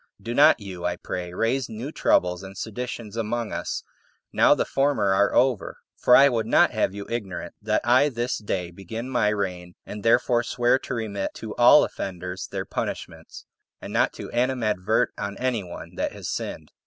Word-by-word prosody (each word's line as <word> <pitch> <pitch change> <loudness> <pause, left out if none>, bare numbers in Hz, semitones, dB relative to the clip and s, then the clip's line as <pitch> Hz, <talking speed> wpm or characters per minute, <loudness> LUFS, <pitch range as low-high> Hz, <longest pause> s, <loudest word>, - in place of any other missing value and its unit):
Do 115 - -5
not 140 0 +6
you, 95 -4 -8
I 90 0 0
pray, 90 0 -5
raise 115 +7 0
new 120 +7 -6
troubles 90 - +2
and 95 0 -10
seditions 115 -1 -5
among 115 0 -2
us, - - -3 0.5
now - - +5
the - - 0
former 135 -8 +1
are 100 +1 +3
over; 125 -5 +1 0.2
for 125 - +5
I 140 - +8
would 115 -4 0
not - - +4
have 95 - 0
you 100 0 -6
ignorant 95 -7 -5
that 105 0 0
I 130 +5 +5
this 120 -1 -2
day 90 -4 -3
begin 110 +8 -7
my 120 -4 +2
reign, 90 -4 -3
and 105 - -7
therefore 120 +1 +3
swear 120 +1 +1
to 125 - -5
remit 105 -4 -3
to 110 -1 -7
all 120 +5 +7
offenders 90 0 -5
their 95 -1 -4
punishments, - - -6 0.3
and - - -8
not - - +2
to - - -8
animadvert 120 -6 +1
on 100 0 -4
any 125 -5 -1
one 90 -1 -9
that - - -1
has - - -7
sinned. - - -5
110 Hz, 180 wpm, -25 LUFS, 95-120 Hz, 0.5 s, I